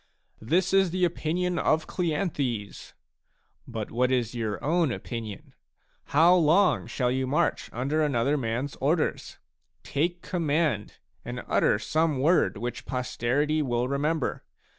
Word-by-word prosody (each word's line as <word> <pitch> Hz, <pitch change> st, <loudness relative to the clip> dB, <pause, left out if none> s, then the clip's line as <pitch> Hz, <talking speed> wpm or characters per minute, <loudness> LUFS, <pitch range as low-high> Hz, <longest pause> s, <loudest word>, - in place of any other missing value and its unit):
"This 175 Hz, +11 st, +1 dB
is 195 Hz, -1 st, +4 dB
the 180 Hz, +1 st, +1 dB
opinion 175 Hz, +1 st, -1 dB
of 155 Hz, 0 st, +2 dB
Cleanthes." 150 Hz, -, -3 dB, 0.7 s
But 110 Hz, -4 st, -5 dB
what 125 Hz, +2 st, +1 dB
is 120 Hz, -3 st, 0 dB
your 110 Hz, -4 st, -2 dB
own 165 Hz, -1 st, +2 dB
opinion? 115 Hz, -4 st, -6 dB, 0.5 s
How 165 Hz, +5 st, +5 dB
long 180 Hz, +3 st, +3 dB
shall 125 Hz, -2 st, 0 dB
you 130 Hz, 0 st, -1 dB
march 140 Hz, +4 st, 0 dB
under 140 Hz, +6 st, -1 dB
another 140 Hz, -1 st, +1 dB
rnans 130 Hz, +1 st, -2 dB
orders? 150 Hz, +4 st, 0 dB, 0.5 s
Take 175 Hz, +5 st, -1 dB
command, 155 Hz, -, -1 dB, 0.3 s
and -, -, -6 dB
utter -, -, +3 dB
some 155 Hz, +6 st, 0 dB
word 160 Hz, -, +3 dB
which 120 Hz, +4 st, -5 dB
posterity 135 Hz, +4 st, 0 dB
will 120 Hz, -3 st, 0 dB
remember. 145 Hz, +2 st, -1 dB
145 Hz, 125 wpm, -27 LUFS, 125-165 Hz, 0.7 s, How